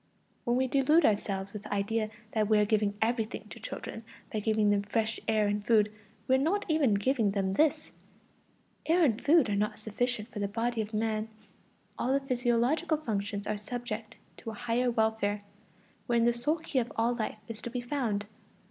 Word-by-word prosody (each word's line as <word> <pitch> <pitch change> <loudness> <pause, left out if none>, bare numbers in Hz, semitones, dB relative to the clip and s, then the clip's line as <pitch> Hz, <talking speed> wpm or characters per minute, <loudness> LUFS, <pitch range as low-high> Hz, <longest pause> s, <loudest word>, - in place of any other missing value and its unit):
When 240 0 +2
we 260 - +2
delude 280 +5 +4
ourselves 200 -2 0
with 210 - -6
the - - -10
idea 215 +2 0 0.2
that 215 -2 +1
we 215 - +5
are 210 - +4
giving 205 -1 +1
everything 225 0 -2
to - - -9
children 225 - -6 0.3
by 215 - 0
giving 215 -1 +2
them 200 -1 +3
fresh 220 +2 -1
air 215 -1 +3
and 205 0 0
food, 215 -2 +3 0.4
we 260 - +3
are - - +6
not 390 +9 +1
even 295 -9 +3
giving 225 +1 +2
them 190 -2 0
this: 305 +8 +2 1.0
air 340 +2 +4
and 235 -7 +2
food 305 -1 +5
are 205 - 0
not 210 +1 0
sufficient 220 +1 -2
for 210 - -6
the 200 - 0
body 230 +3 -1
of 215 0 -5
man; 215 0 -1 0.7
all 255 - 0
the 275 - +3
physiological 255 +5 +1
functions 205 -7 -3
are 210 0 -1
subject 225 0 -5 0.2
to - - -7
a 220 - -6
higher 245 +2 0
welfare, 220 -3 0 0.6
wherein 235 -1 +3
the 240 - +4
sole 245 +7 0
key 305 -4 -1
of 240 -1 -2
all 230 +2 +2
life 220 -2 -3
is 230 -1 -7
to - - -5
be 245 - -3
found. 240 -5 -1
225 Hz, 190 wpm, -30 LUFS, 210-245 Hz, 1.0 s, are